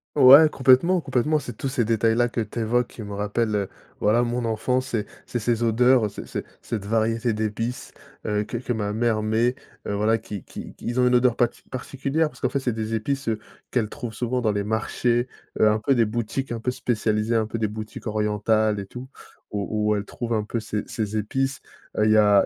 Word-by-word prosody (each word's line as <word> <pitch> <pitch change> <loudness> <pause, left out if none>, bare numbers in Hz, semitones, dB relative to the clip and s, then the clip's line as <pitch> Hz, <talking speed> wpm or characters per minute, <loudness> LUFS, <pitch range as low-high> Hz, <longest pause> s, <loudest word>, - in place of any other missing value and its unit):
Ouais, 140 +2 +9
complètement, 155 +8 +4
complètement. 150 +3 +1
C'est 120 -5 -8
tous 135 - -3
ces 130 -3 0
détails-là 115 +2 +2
que 115 - -3
tu 110 +2 -3
évoques 120 +2 +1
qui 115 - -11
me 100 0 -7
rappellent, 105 0 -1 0.3
voilà, 115 +4 +3
mon 120 0 -1
enfance. 125 +4 0
C'est 110 -4 -2 0.2
c'est 120 - -3
ces 115 +1 0
odeurs, 120 0 +4
c'est - - -8
c'est - - -5 0.2
cette 105 -4 -4
variété 115 +1 +1
d'épices, 110 +3 -3 0.3
heu, 105 0 0
que 115 - -7
que 120 +1 -3
ma 105 -3 -1
mère 110 -1 +1
met, 115 +4 +1 0.3
heu - - -3
voilà, 110 +2 +2
qui 105 -4 -7
qui - - -9
qu'ils 120 +2 -2
ont 125 - +4
une 125 - +4
odeur 125 -1 +4
pati 120 -1 0
particulière 140 +4 -2
parce - - -17
qu'en - - +1
fait 140 - -1
c'est 125 - 0
des 110 0 -3
épices, 135 +4 -2
heu, 110 -1 0 0.3
qu'elle 110 -4 0
trouve 120 -6 -6
souvent 125 +3 -1
dans 110 -3 +1
les 100 0 -1
marchés, 120 +3 0 0.3
heu, 110 - +6
un 110 - +2
peu 135 +5 +2
des 115 -2 +4
boutiques 120 +3 -3
un 115 - -5
peu 125 - 0
spécialisées, 115 -3 0
un 110 -1 +2
peu 110 +2 -4
des 110 -1 0
boutiques 110 +2 -7
orientales 105 0 +1
et 100 - -5
tout 125 +6 -9 0.4
où 105 +1 -1
où 105 - +3
elle 100 - -4
trouve 120 -1 -6
un 105 -1 0
peu 115 +1 -3
ces 105 -1 -3
ces 110 -1 -3
épices. 135 +6 -1 0.4
Heu, 105 - +3
il 110 - +4
y 110 - +5
a 105 -2 +5
115 Hz, 220 wpm, -24 LUFS, 105-125 Hz, 0.4 s, Ouais